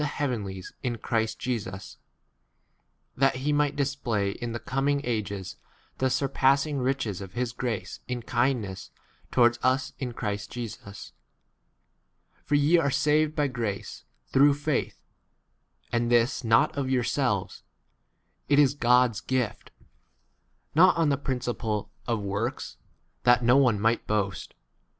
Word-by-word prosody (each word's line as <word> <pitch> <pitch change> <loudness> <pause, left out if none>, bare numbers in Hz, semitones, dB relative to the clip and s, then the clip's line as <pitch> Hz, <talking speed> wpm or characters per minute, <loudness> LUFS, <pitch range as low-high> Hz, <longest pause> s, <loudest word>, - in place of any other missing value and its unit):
heavenlies 110 -11 -3
in 120 -2 -2
Christ 110 0 -1
Jesus, 105 -6 -5 1.2
that 135 +1 +3
he 140 +3 -1
might 145 0 +1
display 130 -8 -1
in 120 +3 -5
the 115 - -3
coming 140 +2 0
ages 100 -6 -3 0.4
the 130 - +2
surpassing 140 +2 +2
riches 125 -7 -1
of 95 -1 -9
his 120 -1 -2
grace 120 -4 -4
in 125 -1 -4
kindness 120 -6 -1
k - - -37 0.3
towards 120 -1 +4
us 130 +1 +1
in 130 - -3
8 120 - -10
Christ 105 -2 -3
Jesus. 110 -4 -8 1.3
For 145 - +1
ye 150 +4 +4
are 140 - +1
saved 150 +2 +2
by 150 - +2
grace, 115 -7 -4 0.3
through 140 +1 +6
faith; 145 -1 -2 0.9
and 120 0 0
this 120 +3 +2
not 120 +7 +3
9 140 - -1
of 130 - -4
yourselves; 125 -5 0 0.9
it 145 - +4
is 140 -2 +5
God's 125 -4 +3
gift: 130 -4 -2 1.0
not 180 +3 +6
on 165 -3 +3
the 140 - +3
principle 120 -6 -3 0.2
of 115 -2 0
works, 100 +5 -3 0.4
that 120 -1 +5
10 - - -2
no 120 +3 +6
one 125 -7 +3
might 115 +3 +1
boast. 100 -2 -2
125 Hz, 135 wpm, -27 LUFS, 110-140 Hz, 1.3 s, through